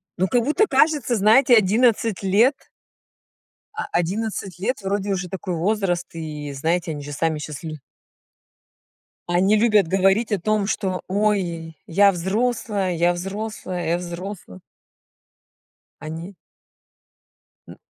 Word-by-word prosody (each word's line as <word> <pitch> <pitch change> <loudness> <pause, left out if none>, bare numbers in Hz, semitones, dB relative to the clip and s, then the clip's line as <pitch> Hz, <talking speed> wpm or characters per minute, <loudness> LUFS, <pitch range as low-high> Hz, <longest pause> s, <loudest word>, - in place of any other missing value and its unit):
Ну, 185 +2 +1
как 240 +3 +2
будто 310 - +2
кажется, 285 -3 +2
знаете, 225 +5 +5
11 220 0 +2
лет 210 +8 +4 1.2
А, - - -4
11 195 +1 -2
лет 225 +4 -2
вроде 200 +1 -2
уже 185 -2 -2
такой 185 -1 -4
возраст, 180 0 0
и 150 -3 -6
знаете, 165 +4 -1
они 145 -2 -5
же 145 - -7
сами 155 +2 -1
щас 150 0 -7
лю 155 -1 -6 1.5
они 190 +5 +3
любят 210 -5 +3
говорить 195 +4 +2
о 205 - +1
том, 210 +2 0
что: 190 -3 -2
"Ой, 185 -5 -1
я 200 +3 +4
взрослая, 205 +1 -1
я 170 +1 +3
взрослая, 190 -1 -4
я 170 - +2
взрослая". 175 - -8 1.4
Они 165 +5 -7 1.3
Н - - -12
190 Hz, 120 wpm, -22 LUFS, 170-215 Hz, 1.5 s, знаете